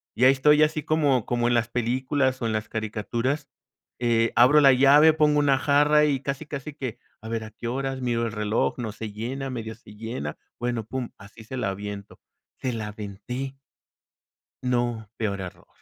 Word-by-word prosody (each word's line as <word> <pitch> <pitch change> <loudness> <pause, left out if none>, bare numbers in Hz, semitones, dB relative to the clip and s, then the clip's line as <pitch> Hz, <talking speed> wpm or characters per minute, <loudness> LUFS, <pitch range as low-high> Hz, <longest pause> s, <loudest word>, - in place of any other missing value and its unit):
Y 125 - +3
ahí 130 - +8
estoy 150 +3 +5
así 155 -1 0
como 145 -7 +2
como 120 -1 0
en 120 - +2
las 120 0 +1
películas, 130 +2 0
o, - - -1
en 110 - 0
las 110 0 -3
caricaturas, 115 +6 -2 0.5
eh, 115 -1 +2
abro 140 +5 +6
la 135 -2 +7
llave, 145 +4 +6
pongo 150 -1 +3
una 140 -2 +3
jarra 150 +2 +4
y 140 -3 +1
casi, 140 +2 -4
casi 145 0 -6
que, 130 -6 -5 0.2
a 110 - -9
ver, 115 -1 -2
¿a 110 - -9
qué 115 - -7
horas? 135 +1 -2
Miro 120 -1 0
el 115 - -3
reloj, 105 0 0
no 115 -3 -4
se 110 0 -7
llena, 130 +6 -4
medio 110 -3 -5
se 105 -2 -16
llena, 110 - -5 0.2
bueno, 120 -2 -2
pum, 125 0 -4
así 105 +3 -14
se 130 +4 -7
la 100 - -1
aviento, 100 0 -7 0.4
se 125 -2 -2
la 110 -2 -4
aventé. 110 +6 -6 1.1
No, 120 -4 -1
peor 100 -3 -2
error. 90 - -9
120 Hz, 190 wpm, -25 LUFS, 110-135 Hz, 1.1 s, ahí